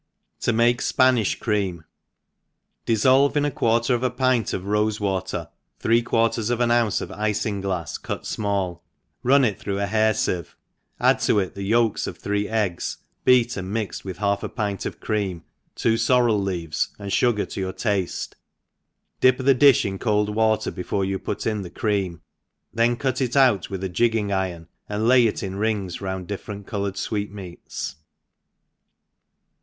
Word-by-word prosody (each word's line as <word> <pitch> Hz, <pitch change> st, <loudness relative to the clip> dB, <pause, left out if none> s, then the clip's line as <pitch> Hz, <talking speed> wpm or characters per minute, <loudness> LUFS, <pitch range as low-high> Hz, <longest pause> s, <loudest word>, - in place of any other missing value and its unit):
To -, -, +1 dB
make 120 Hz, +2 st, +3 dB
Spanish 125 Hz, -5 st, +3 dB
Cream. 95 Hz, -7 st, -1 dB, 1.0 s
DISSOLVE 130 Hz, +6 st, +4 dB
In 145 Hz, -, +2 dB
a 145 Hz, -, 0 dB
quarter 115 Hz, 0 st, +1 dB
of 120 Hz, -, 0 dB
a 130 Hz, -, +1 dB
pint 125 Hz, -3 st, +1 dB
of 90 Hz, -, -3 dB
rofc. 105 Hz, +1 st, 0 dB
water 95 Hz, -3 st, -2 dB, 0.3 s
three 115 Hz, +1 st, +3 dB
quarters 115 Hz, -1 st, +1 dB
of 120 Hz, -1 st, 0 dB
an 120 Hz, -1 st, +2 dB
ounce 120 Hz, -3 st, +2 dB
of -, -, -5 dB
iiioglafs 100 Hz, -5 st, -2 dB
cut -, -, -5 dB
fmall, 100 Hz, -5 st, -2 dB, 0.4 s
run 135 Hz, +2 st, +4 dB
it 105 Hz, -6 st, -1 dB
through 100 Hz, -1 st, -3 dB
a 100 Hz, -, +1 dB
hair 110 Hz, +2 st, +2 dB
licve, 85 Hz, -5 st, -2 dB, 0.4 s
add -, -, +4 dB
to -, -, +2 dB
it 95 Hz, -3 st, 0 dB
the 100 Hz, -, -7 dB
yolks 110 Hz, +2 st, +1 dB
of -, -, -6 dB
three 105 Hz, 0 st, -2 dB
eggs, 105 Hz, -6 st, -1 dB, 0.3 s
beat 125 Hz, -2 st, +4 dB
and 95 Hz, 0 st, -5 dB
mixed 110 Hz, -2 st, -3 dB
with 95 Hz, -2 st, -6 dB
half 100 Hz, 0 st, 0 dB
a -, -, -4 dB
pint 105 Hz, -4 st, -3 dB
of -, -, -8 dB
cream, 100 Hz, -6 st, -2 dB, 0.3 s
two 115 Hz, 0 st, +1 dB
forrel 115 Hz, -3 st, +3 dB
leaves^ 85 Hz, -5 st, -1 dB
and 100 Hz, -1 st, -6 dB
fugar 120 Hz, -3 st, +2 dB
to -, -, -5 dB
your 95 Hz, -1 st, -2 dB
tafle, 100 Hz, -5 st, -2 dB, 0.9 s
dip 130 Hz, 0 st, +5 dB
the 135 Hz, +1 st, +4 dB
difh 140 Hz, 0 st, +5 dB
in 95 Hz, -1 st, -3 dB
cold 105 Hz, -2 st, +1 dB
water 110 Hz, 0 st, +1 dB
before 95 Hz, +1 st, -2 dB
you 95 Hz, 0 st, -2 dB
put -, -, -4 dB
in 105 Hz, -2 st, 0 dB
the 90 Hz, -, -7 dB
cream, 100 Hz, -7 st, -2 dB, 0.5 s
then 115 Hz, +1 st, +2 dB
cut 130 Hz, +1 st, -1 dB
it 125 Hz, 0 st, -1 dB
out 125 Hz, -9 st, +4 dB
with 95 Hz, -1 st, -5 dB
a -, -, 0 dB
jigging 110 Hz, +1 st, +1 dB
iron, 90 Hz, -4 st, -2 dB, 0.2 s
and 105 Hz, +2 st, -1 dB
lay 125 Hz, -1 st, +6 dB
it 110 Hz, -, -3 dB
ii) 95 Hz, -, -2 dB
rings 100 Hz, -2 st, -2 dB
round 95 Hz, -1 st, -4 dB
different 100 Hz, 0 st, -6 dB
coloured 100 Hz, -1 st, -3 dB
fweetmeats. 100 Hz, -5 st, -5 dB
105 Hz, 170 wpm, -23 LUFS, 95-115 Hz, 1.0 s, lay